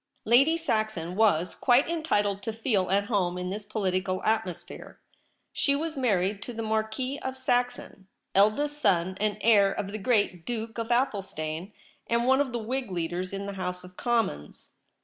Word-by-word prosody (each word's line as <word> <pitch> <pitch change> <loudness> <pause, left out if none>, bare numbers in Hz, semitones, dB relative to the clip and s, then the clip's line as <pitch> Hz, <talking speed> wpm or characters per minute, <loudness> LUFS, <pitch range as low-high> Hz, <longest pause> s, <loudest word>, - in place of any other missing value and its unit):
Lady 275 +9 +5
Saxon 215 - -2
was 185 -5 +3
quite 250 +1 +3
entitled 210 -12 0
to 225 - -3
feel 220 -5 0
at 200 +2 +3
home 190 -5 0
in 180 0 -3
this 205 +1 -5
political 185 -3 -1
atmosphere. 220 -6 -3 0.5
She 280 - +2
was 315 +2 -3
married 200 -6 +1
to 245 - -6
the 225 0 -4
Marquis 220 +5 -2
of 260 0 -5
Saxon, 245 -6 -1 0.3
eldest 285 +10 +3
son 185 -5 +2
and 210 0 0
heir 205 -3 +5
of 195 0 -4
the 215 - -5
great 205 -6 +1
Duke 230 0 -4
of 230 0 -3
Athelstane, 195 - -1 0.4
and 235 +1 +1
one 265 +2 +4
of 275 -3 -1
the 240 - -2
Whig 245 +1 -3
leaders 175 +1 -3
in 200 0 -4
the 200 - -5
House 180 -1 -4
of 180 0 -13
Commons. 225 - -2
215 Hz, 170 wpm, -27 LUFS, 185-245 Hz, 0.5 s, Lady